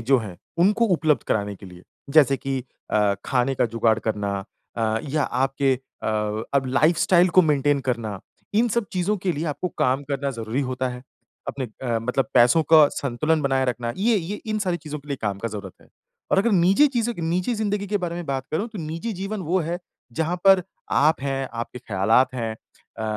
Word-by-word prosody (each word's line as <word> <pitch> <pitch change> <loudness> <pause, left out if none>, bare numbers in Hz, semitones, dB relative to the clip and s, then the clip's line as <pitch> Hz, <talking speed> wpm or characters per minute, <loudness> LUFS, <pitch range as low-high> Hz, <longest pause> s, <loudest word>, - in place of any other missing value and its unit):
जो 135 +2 +4
हैं 105 -6 -7 0.2
उनको 210 +6 +4
उपलब्ध 155 -6 +1
कराने 105 -1 0
के 95 - -12
लिए। 90 -1 -13 0.3
जैसे 140 -3 +6
कि 135 0 -3 0.3
अ, 105 -2 +3
खाने 130 +1 +1
का - - +2
जुगाड़ 115 -1 +1
करना 105 -3 -2 0.4
अ, 110 -1 +1
या 150 +2 +1
आपके 135 +1 +1 0.3
अ, - - -1 0.5
अब 135 -1 +2
लाइफ़स्टाइल 170 +6 +4
को - - +9
मेंटेन 145 -2 +2
करना। 110 -5 -4 0.3
इन 230 +3 +3
सब 235 -1 0
चीज़ों 185 +3 0
के 190 -2 -1
लिए 155 +1 -3
आपको 180 - -3
काम 130 +2 +2
करना 140 0 -1
ज़रूरी 115 +1 -3
होता 130 0 -1
है। 125 0 -7 0.5
अपने 135 - -3 0.2
अ, 120 -3 0
मतलब 125 +2 -1
पैसों 125 +6 +6
का 155 -2 +9
संतुलन 150 +4 0
बनाए 135 -1 +1
रखना 120 -1 -2
ये 220 +4 +2
ये 195 +2 -4
इन 215 -1 -1
सारी 185 -4 0
चीज़ों 150 -2 -7
के 145 +1 -17
लिए 140 - -2
काम 100 -2 -1
का 115 - -3
ज़रूरत 100 -3 -7
है। - - -23 0.4
और - - +4
अगर 235 +4 +3
निजी 190 +9 +5
चीज़ों 240 0 +1
की 170 - -6
निजी 180 +7 0
ज़िंदगी 205 -2 -1
के 205 +1 0
बारे 170 -1 -2
में 175 0 -5
बात 135 -1 -2
करूँ 195 +8 -1
तो 215 -3 -9
निजी 165 +9 -4
जीवन 195 +2 -4
वो 185 - +3
है 170 +2 -3 0.3
जहाँ 165 +7 -1
पर 190 -1 +7 0.3
आप 150 +2 +3
हैं, 135 -1 -2
आपके 115 +1 -5
ख़्यालात 110 +5 +2
हैं, 115 -3 -2
अ, 110 - -14
140 Hz, 200 wpm, -23 LUFS, 120-180 Hz, 0.5 s, को